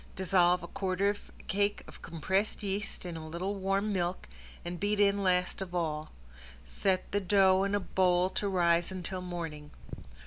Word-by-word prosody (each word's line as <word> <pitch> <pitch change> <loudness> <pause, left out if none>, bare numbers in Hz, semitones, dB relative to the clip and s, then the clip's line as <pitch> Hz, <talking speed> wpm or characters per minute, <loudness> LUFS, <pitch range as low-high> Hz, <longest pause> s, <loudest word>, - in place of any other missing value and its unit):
Dissolve 180 -1 +3
a - - -5
quarter 190 +2 0
of 205 - -11
a - - -15
cake 205 +1 0
of - - -13
compressed 190 +7 -1
yeast 200 -1 -4
in 175 -2 -5
a 160 -1 -7
little 180 +5 -2
warm 195 +1 0
milk 180 -1 -2 0.4
and 175 0 -4
beat 205 +1 0
in 200 0 +4
last 180 0 +1
of 180 -2 -5
all. 155 -3 -1 0.6
Set 185 - -1
the 205 - +2
dough 190 0 +4
in 200 +1 +1
a - - +2
bowl 185 -1 +2
to 200 +1 -1
rise 175 -2 +2
until 185 0 -3
morning. 165 -5 -6
185 Hz, 175 wpm, -31 LUFS, 175-200 Hz, 0.6 s, in